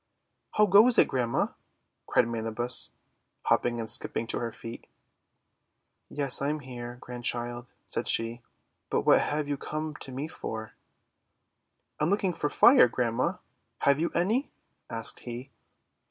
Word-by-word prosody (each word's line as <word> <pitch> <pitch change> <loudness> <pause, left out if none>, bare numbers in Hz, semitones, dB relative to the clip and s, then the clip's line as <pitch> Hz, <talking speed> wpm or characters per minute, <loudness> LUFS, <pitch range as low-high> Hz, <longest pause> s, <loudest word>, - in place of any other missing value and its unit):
'How 210 - +5
goes 210 +5 +6
it, - - +6
Grandma?' 125 -3 0 0.6
cried - - +3
Manabus, 115 +1 +1 0.5
hopping 120 -1 +1
and 115 - -4
skipping 115 0 +2
to 115 - -2
her 115 -1 -3
feet. 115 +1 -10 1.2
;Yes, 140 -3 +2
I'm 150 +2 -1
here, 120 -2 -8
Grandchild," 120 0 -3 0.2
said - - -3
she. 115 +1 +2 0.5
"But - - +1
what - - +5
have 150 0 -1
you 145 -1 -2
come 155 +2 -4
to 135 - -9
me 135 +4 -4
for? 110 -8 -6 0.7
' - - -51
''I'm 150 - +2
looking 195 -2 +1
for 150 - -2
Fire, 255 - +7
Grandma; 125 +9 -1 0.5
have 140 +1 +5
you 170 - 0
any?" 215 +11 +1 0.4
asked 115 -1 -4
he. 125 +3 -8
125 Hz, 140 wpm, -28 LUFS, 120-155 Hz, 1.2 s, Fire